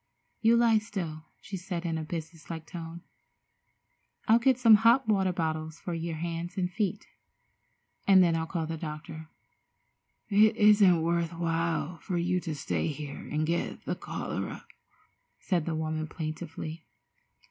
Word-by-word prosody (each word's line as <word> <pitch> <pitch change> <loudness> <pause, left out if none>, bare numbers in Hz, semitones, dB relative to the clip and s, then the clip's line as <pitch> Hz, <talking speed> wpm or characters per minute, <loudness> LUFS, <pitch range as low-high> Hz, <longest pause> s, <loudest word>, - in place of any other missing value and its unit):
"You 230 +1 +5
lie 230 -2 +5
still," 175 -8 -5 0.2
she 200 - -7
said 180 -1 -5
in 165 -1 -1
a 160 - -2
business 160 0 -7
like 160 -1 -5
tone. 170 0 -8 1.3
"I'll 225 +2 +6
get 255 +1 +3
some 235 -3 +7
hot 235 +2 +5
water 195 -3 +2
bottles 160 -2 -3
for 175 - -5
your 165 0 -3
hands 170 +3 -4
and 180 -1 0
feet, 200 -2 -2 1.0
and 190 -2 +7
then 170 -2 +3
I'll 160 0 -1
call 165 -2 -2
the 165 +1 -4
doctor." 155 0 -7 1.0
"It 215 +2 +5
isn't 205 -6 +6
worth 170 0 0
while 165 0 -1
for 180 -3 -3
you 180 +1 +1
to 160 -3 -4
stay 140 +2 -1
here 145 -2 -6
and 155 +1 0
get 170 +2 -2
the - - -1
cholera," - - -5 0.7
said 175 -5 -1
the 165 - -1
woman 155 0 -2
plaintively. 160 0 -6
170 Hz, 150 wpm, -29 LUFS, 160-190 Hz, 1.3 s, some